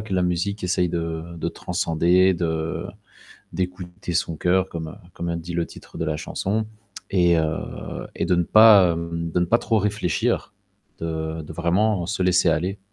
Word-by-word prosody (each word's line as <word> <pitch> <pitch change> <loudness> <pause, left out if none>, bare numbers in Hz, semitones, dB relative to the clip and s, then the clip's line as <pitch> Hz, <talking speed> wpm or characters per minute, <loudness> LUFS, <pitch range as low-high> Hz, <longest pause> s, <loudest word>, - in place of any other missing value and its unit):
que 105 -2 -4
la 90 - +2
musique 90 +3 -1
essaye 90 0 +1
de 85 0 -4
de 80 - -2
transcender, 90 +1 +2
de 80 -2 -2 0.7
d'écouter 90 0 -4
son 85 -1 0
coeur 90 +3 +2
comme 80 -2 -6 0.2
comme 85 - -4
a 85 - -1
dit 85 +1 -6
le 85 0 0
titre - - -13
de 80 - -1
la 75 0 -1
chanson 105 +7 -2 0.5
et 85 -3 +4
heu, 80 0 -3
et - - -1
de 90 - +2
ne 85 - +2
pas, 105 -2 +7
hem, 85 0 -4
de 90 - +1
ne 90 - +2
pas 115 +7 +3
trop 115 - +1
réfléchir, 105 -4 0 0.5
de 80 0 -3
de 80 - -9
vraiment 90 +3 +1
se 95 -1 -1
laisser 90 -1 +4
aller. 90 +5 0
85 Hz, 175 wpm, -23 LUFS, 85-95 Hz, 0.7 s, pas